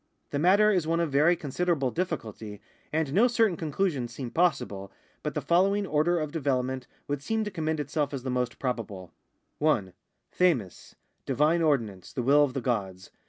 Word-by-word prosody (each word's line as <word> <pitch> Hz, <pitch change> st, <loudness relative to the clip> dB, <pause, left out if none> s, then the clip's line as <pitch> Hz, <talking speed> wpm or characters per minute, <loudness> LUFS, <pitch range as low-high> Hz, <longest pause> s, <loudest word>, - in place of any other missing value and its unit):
The 140 Hz, -, -1 dB
matter 200 Hz, +6 st, +5 dB
is 180 Hz, -6 st, +1 dB
one 165 Hz, +1 st, +1 dB
of 165 Hz, -3 st, 0 dB
very 150 Hz, +6 st, +4 dB
considerable 155 Hz, -3 st, -1 dB
difficulty, 110 Hz, -, -4 dB, 0.3 s
and 155 Hz, -3 st, -1 dB
no 225 Hz, +8 st, +5 dB
certain 225 Hz, -6 st, +2 dB
conclusions 155 Hz, -6 st, -1 dB
seem 125 Hz, -4 st, -6 dB
possible, 125 Hz, -, 0 dB, 0.3 s
but 150 Hz, -2 st, -4 dB
the 150 Hz, -, -2 dB
following 195 Hz, +6 st, +2 dB
order 170 Hz, +1 st, +2 dB
of 155 Hz, -2 st, -3 dB
development 130 Hz, -4 st, -1 dB, 0.2 s
would 145 Hz, -1 st, -2 dB
seem 220 Hz, +8 st, -1 dB
to 210 Hz, -, -4 dB
commend 160 Hz, -3 st, -2 dB
itself 145 Hz, 0 st, -1 dB
as 135 Hz, -3 st, -5 dB
the 130 Hz, -, -2 dB
most 125 Hz, -1 st, -1 dB
probable: 105 Hz, -8 st, -4 dB, 0.2 s
— -, -, -48 dB
1. 115 Hz, -, +1 dB, 0.4 s
QffxiQ, 145 Hz, -, 0 dB, 0.3 s
divine 155 Hz, +4 st, +2 dB
ordinance, 115 Hz, -, 0 dB
the 125 Hz, -, -2 dB
will 145 Hz, +4 st, +5 dB
of 140 Hz, -2 st, -1 dB
the 135 Hz, -, -1 dB
gods. 95 Hz, -7 st, -3 dB
145 Hz, 175 wpm, -28 LUFS, 125-170 Hz, 0.4 s, matter